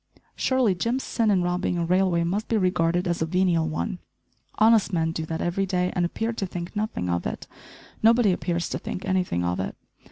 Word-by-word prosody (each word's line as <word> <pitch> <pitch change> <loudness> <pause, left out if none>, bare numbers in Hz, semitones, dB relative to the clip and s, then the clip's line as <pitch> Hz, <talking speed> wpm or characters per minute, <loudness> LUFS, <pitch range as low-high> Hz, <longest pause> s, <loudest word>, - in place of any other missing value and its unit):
Surely 260 -6 +2
Jim's 230 +9 -1
sin 225 -2 0
in 190 -3 +3
robbing 180 0 -1
a 170 - 0
railway 180 -1 +2
must 195 +6 -1
be 225 - +1
regarded 180 -2 +1
as 170 -1 -1
a - - +2
venial 170 -2 +2
one. 180 +5 -3 0.6
Honest 220 -1 +4
men 165 -2 0
do 160 -1 -4
that 160 0 -3
every 190 +3 0
day 180 -1 0
and 180 - +1
appear 225 +6 -2
to 200 -4 -3
think 175 +2 -6
nothing 210 - -2
of 85 -1 -1
it! - - -5 0.6
Nobody 230 -2 +5
appears 175 -1 -1
to - - -3
think 185 - -6
anything 180 - 0
of 90 0 -1
it. 95 - -3
180 Hz, 200 wpm, -25 LUFS, 170-205 Hz, 0.6 s, Nobody